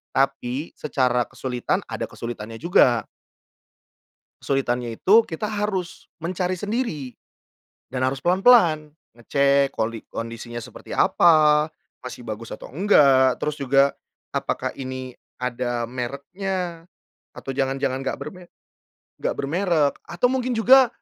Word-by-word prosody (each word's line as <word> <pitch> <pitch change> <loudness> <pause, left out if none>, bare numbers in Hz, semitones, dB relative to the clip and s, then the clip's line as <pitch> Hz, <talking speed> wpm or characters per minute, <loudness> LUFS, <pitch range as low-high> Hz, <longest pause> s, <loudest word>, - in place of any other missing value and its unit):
Tapi 135 +1 0
secara 125 -4 +1
kesulitan 125 -2 -2
ada - - -4
kesulitannya 115 -1 -7
juga. 125 - +3 1.4
Kesulitannya 120 -4 -1
itu 220 +4 +6
kita 180 +4 -4
harus 205 -4 -3
mencari 180 +2 -2
sendiri 205 - -3 0.8
dan 130 0 -1
harus 135 +1 -2
pelan-pelan, 175 -5 +4 0.2
ngecek 140 +3 +2
koli 115 0 -3
kondisinya 115 +1 -6
seperti 120 0 -10
apa? 155 -2 +5 0.4
Masih 125 - -7
bagus 110 0 -6
atau - - -9
enggak? 140 -7 +4
Terus 150 0 -2
juga 135 0 +4 0.5
apakah - - -2
ini 130 -1 -6 0.2
ada 120 -1 -2
mereknya, 165 +7 -4 0.5
atau - - -10
jangan-jangan 135 0 -1
gak - - -3
berme 180 -2 -8 0.7
gak - - -1
bermerek 160 0 +1
atau 245 +9 +1
mungkin 255 -1 -1
juga 255 +3 +6
140 Hz, 110 wpm, -23 LUFS, 125-180 Hz, 1.4 s, itu